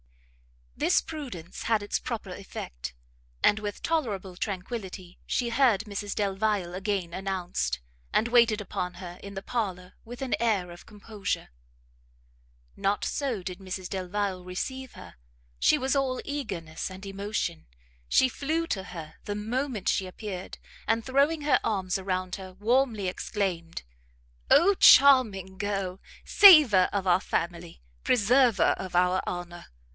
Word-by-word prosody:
This -, -, +3 dB
prudence 255 Hz, -, -7 dB
had 220 Hz, -3 st, +1 dB
its 205 Hz, -, -1 dB
proper 215 Hz, -5 st, -5 dB
effect, -, -, -7 dB, 0.5 s
and 210 Hz, -, +4 dB
with 205 Hz, -1 st, -6 dB
tolerable 210 Hz, -, -2 dB
tranquility 190 Hz, -2 st, -5 dB
she 240 Hz, -2 st, 0 dB
heard 235 Hz, -4 st, +3 dB
Mrs 205 Hz, -2 st, -5 dB
Delvile 200 Hz, -2 st, 0 dB
again 190 Hz, -2 st, -2 dB
announced, 175 Hz, -, -2 dB, 0.3 s
and 225 Hz, -, +2 dB
waited 235 Hz, -3 st, +4 dB
upon 180 Hz, -3 st, -4 dB
her 180 Hz, -1 st, -9 dB
in 200 Hz, 0 st, -9 dB
the 195 Hz, -, -5 dB
parlour 185 Hz, -6 st, -3 dB
with 245 Hz, +3 st, -8 dB
an 260 Hz, -, -2 dB
air 205 Hz, -7 st, 0 dB
of 175 Hz, -, -13 dB
composure. 210 Hz, -1 st, -4 dB, 1.3 s
Not 200 Hz, +1 st, 0 dB
so 255 Hz, -9 st, -2 dB
did 180 Hz, 0 st, -6 dB
Mrs 185 Hz, -1 st, -6 dB
Delvile 190 Hz, 0 st, -3 dB
receive 260 Hz, +9 st, -5 dB
her; -, -, -12 dB, 0.4 s
she 65 Hz, -, +4 dB
was 265 Hz, +2 st, 0 dB
all 265 Hz, -2 st, 0 dB
eagerness 185 Hz, -, -4 dB
and 190 Hz, +1 st, -10 dB
emotion; 195 Hz, -, -3 dB, 0.4 s
she 260 Hz, -, +5 dB
flew 315 Hz, +5 st, -2 dB
to 190 Hz, -8 st, -3 dB
her 165 Hz, -4 st, -9 dB
the 205 Hz, -, -3 dB
moment 225 Hz, +1 st, -3 dB
she 190 Hz, -, +1 dB
appeared, 185 Hz, -1 st, -7 dB, 0.3 s
and 225 Hz, +1 st, +1 dB
throwing 280 Hz, +4 st, +2 dB
her 290 Hz, -3 st, +3 dB
arms 195 Hz, -3 st, -1 dB
around 185 Hz, -1 st, -2 dB
her, 190 Hz, -1 st, -9 dB
warmly 225 Hz, 0 st, +1 dB
exclaimed 180 Hz, -3 st, -3 dB, 0.7 s
"Oh 340 Hz, +9 st, +6 dB
charming 225 Hz, -, +6 dB
girl! 195 Hz, -2 st, -2 dB, 0.3 s
Saver 300 Hz, -, +8 dB
of 200 Hz, -2 st, -1 dB
our 180 Hz, 0 st, +4 dB
family! 170 Hz, -, -3 dB, 0.2 s
preserver 245 Hz, 0 st, +4 dB
of 185 Hz, -2 st, -6 dB
our 180 Hz, +1 st, +3 dB
honour! 175 Hz, -1 st, -6 dB
200 Hz, 135 wpm, -27 LUFS, 185-235 Hz, 1.3 s, Saver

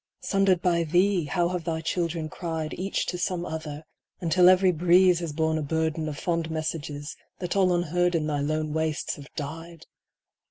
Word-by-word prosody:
Sundered 195 Hz, -3 st, +2 dB
by 170 Hz, -2 st, +2 dB
thee 175 Hz, +2 st, +2 dB
how 175 Hz, +3 st, 0 dB
have 180 Hz, -2 st, -3 dB
thy 160 Hz, -1 st, -2 dB
children 165 Hz, -1 st, -2 dB
cried 160 Hz, -1 st, -4 dB
Each 195 Hz, +2 st, -2 dB
to 180 Hz, -, -3 dB
some 180 Hz, -1 st, -1 dB
other, 155 Hz, -2 st, -6 dB, 0.4 s
until 180 Hz, +1 st, +5 dB
every 185 Hz, 0 st, +5 dB
breeze 180 Hz, +1 st, +4 dB
Has 170 Hz, -3 st, -4 dB
borne 160 Hz, +1 st, 0 dB
a -, -, -2 dB
burden 160 Hz, +1 st, -1 dB
of 145 Hz, -, -6 dB
fond 165 Hz, -1 st, -1 dB
messages 155 Hz, -2 st, -4 dB, 0.2 s
That 180 Hz, 0 st, -3 dB
all 190 Hz, -2 st, +4 dB
unheard 175 Hz, 0 st, +1 dB
in 160 Hz, -2 st, 0 dB
thy 150 Hz, -1 st, -1 dB
lone 155 Hz, +1 st, -1 dB
wastes 160 Hz, -1 st, -1 dB
have 140 Hz, -1 st, -12 dB
died 165 Hz, +3 st, -7 dB
165 Hz, 175 wpm, -26 LUFS, 155-180 Hz, 0.4 s, until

